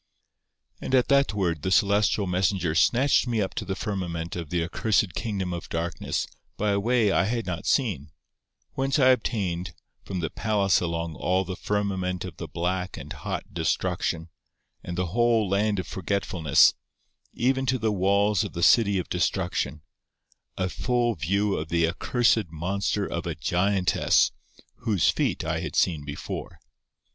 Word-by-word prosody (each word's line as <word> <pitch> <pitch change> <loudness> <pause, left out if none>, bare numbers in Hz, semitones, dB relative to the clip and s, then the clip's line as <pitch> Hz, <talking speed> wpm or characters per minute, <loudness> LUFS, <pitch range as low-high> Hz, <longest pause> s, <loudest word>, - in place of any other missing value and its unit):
And 130 - 0
at 125 - +3
that 140 -5 +3
word 85 -6 0
the 95 - -1
celestial 100 +1 +3
messenger 90 -2 0
snatched 125 - +3
me 115 -2 0
up 95 -2 -1
to - - -4
the 95 - -3
firmament 85 -6 -4
of 85 -4 -5
the 85 -2 0
accursed 100 +2 +1
kingdom 95 -5 -3
of 85 - -6
darkness 80 -1 -2 0.3
by 105 0 +1
a 100 - +1
way 115 -1 +2
I 95 - +2
had 115 +2 -1
not 90 -2 -4
seen, 95 - 0 0.6
whence 135 +1 0
I 130 -3 +5
obtained, 90 - 0 0.3
from 95 -2 -4
the 80 -3 -3
palace 100 -4 +1
along 85 -1 -2
all 90 +7 0
the 90 +1 -5
firmament 95 -3 -2
of 90 -4 -9
the - - -6
black 90 +2 -2
and - - -7
hot - - -5
Destruction, 80 0 -1 0.5
and 90 0 -5
the 90 - 0
whole 120 -2 +3
land 100 +2 +1
of 95 - -2
forgetfulness, 95 -5 +2 0.6
even 130 +2 0
to 130 0 +2
the 110 -2 0
walls 100 +1 +2
of - - -6
the 85 - -3
city 100 -2 +5
of 90 - -2
Destruction, 75 +2 -1 0.7
a 95 - 0
full 120 +4 0
view 100 +5 0
of 80 0 -4
the 85 -1 +2
accursed 110 +2 +1
monster 90 +5 -1
of - - -4
a - - -3
giantess, 90 -1 +2 0.5
whose 100 -7 +1
feet - - -1
I - - -1
had - - -5
seen 80 -5 +2
before. 70 0 -6
95 Hz, 160 wpm, -26 LUFS, 85-110 Hz, 0.7 s, I